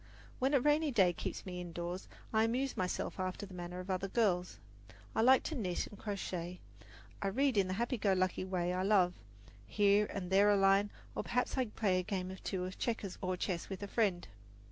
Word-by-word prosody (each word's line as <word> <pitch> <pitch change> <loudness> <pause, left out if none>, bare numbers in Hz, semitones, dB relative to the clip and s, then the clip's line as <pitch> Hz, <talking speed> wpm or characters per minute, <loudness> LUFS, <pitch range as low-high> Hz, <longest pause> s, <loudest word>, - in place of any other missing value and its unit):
When 270 +3 +2
a - - +6
rainy 295 +3 +3
day 190 -9 +4
keeps - - -5
me 180 -1 -5
indoors, 175 +1 -5 0.3
I 220 0 +4
amuse 255 +4 -1
myself 185 -3 -2
after 185 +2 -3
the 195 - -12
manner 175 0 -6
of 185 +1 -4
other 185 +1 -1
girls. 185 -4 +1 0.6
I - - +3
like 260 +3 +6
to - - -3
knit 185 -9 -1
and - - -11
crochet; 180 -4 -4 0.6
I 200 - 0
read 265 +6 +2
in 195 -2 +3
the 185 - -2
happy 235 +2 -1
go 200 -1 +3
lucky 185 0 0
way 180 -1 -1
I 185 - 0
love, 190 -2 +4 0.5
here 205 0 +3
and 185 -2 -5
there 200 +2 +6
a 205 - +5
line; 195 +1 +4 0.2
or - - -2
perhaps 250 +1 -1
I 260 -2 +1
play 205 -4 0
a - - +1
game 185 -1 -3
or 190 - -7
two 185 -1 -3
of 185 - -7
checkers 215 -5 -2
or 185 -1 -1
chess 175 -2 -2
with 195 0 -5
a - - -3
friend. 195 -5 0
195 Hz, 210 wpm, -34 LUFS, 180-220 Hz, 0.6 s, a